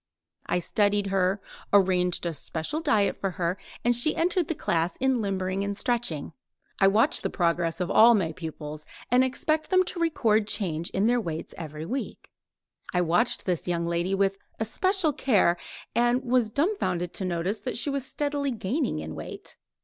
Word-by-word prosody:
I - - +1
studied 205 +3 +1
her, 190 +1 +1 0.3
arranged 180 -3 +3
a 170 - -1
special 160 - -4
diet 210 -9 +2
for 195 - -2
her 175 -1 -1 0.3
and 240 0 +4
she 240 +6 +3
entered 350 0 +1
the 325 - -2
class 170 - 0
in 265 -2 +1
limbering 190 -1 -1
and 200 0 -3
stretching. 230 - -1 0.5
I 195 - +6
watch 210 +4 +3
the - - -1
progress 170 -1 0
of 180 0 -1
all 235 +2 +7
my 175 -6 0
pupils, 155 -2 -7 0.2
and 250 +1 +5
expect 310 +4 -1
them 370 -1 +4
to 355 -1 -5
record 225 -11 +2
the - - 0
change 170 -5 -2
in 195 - 0
their 240 +1 +3
weights 165 -5 -5
every 155 -1 -7
week. 260 +9 -5 0.6
I 180 - +2
watched 175 0 +1
this 180 -3 -1
young 170 -1 0
lady 170 +3 0
with 195 0 +1 0.2
especial 345 - +1
care, 205 -10 +3 0.4
and 240 +2 +2
was 245 -3 +2
dumbfounded 250 - -1
to - - -4
notice 180 +4 -2
that 250 - -3
she 280 +4 +1
was 275 -1 -2
steadily 285 +1 -1
gaining 240 +5 -1
in - - -5
weight. - - -8
200 Hz, 175 wpm, -27 LUFS, 175-255 Hz, 0.6 s, all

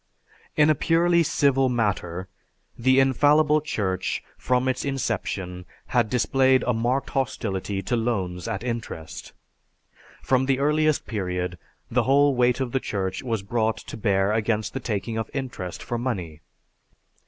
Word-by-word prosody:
In 150 +1 +6
a - - +5
purely 170 +3 +3
civil 135 -4 +2
matter, 95 -6 -1 0.5
the 130 +2 +3
infallible 150 +3 +4
Church 95 - -2
from 125 0 0
its 130 0 0
inception 100 -9 -3 0.3
had 120 -4 +3
displayed 130 +2 +3
a 125 - +1
marked 120 +4 -1
hostility 100 -6 -2
to 120 - 0
loans 95 -7 -2
at 100 - -3
interest. 115 -10 -5 0.9
From 130 0 +2
the 135 -1 +2
earliest 150 +2 +2
period 90 -4 -3 0.3
the 125 +2 +3
whole 140 +4 +4
weight 125 0 +3
of 130 -3 -2
the 135 - +1
Church 95 -6 -3
was 115 -6 -2
brought 110 +1 0
to - - -9
bear 100 -2 +1
against 110 -1 0
the 135 - -2
taking 110 -1 -3
of 110 - -4
interest 125 -10 -5
for 120 - -3
money. 90 -11 -4
120 Hz, 140 wpm, -25 LUFS, 100-135 Hz, 0.9 s, In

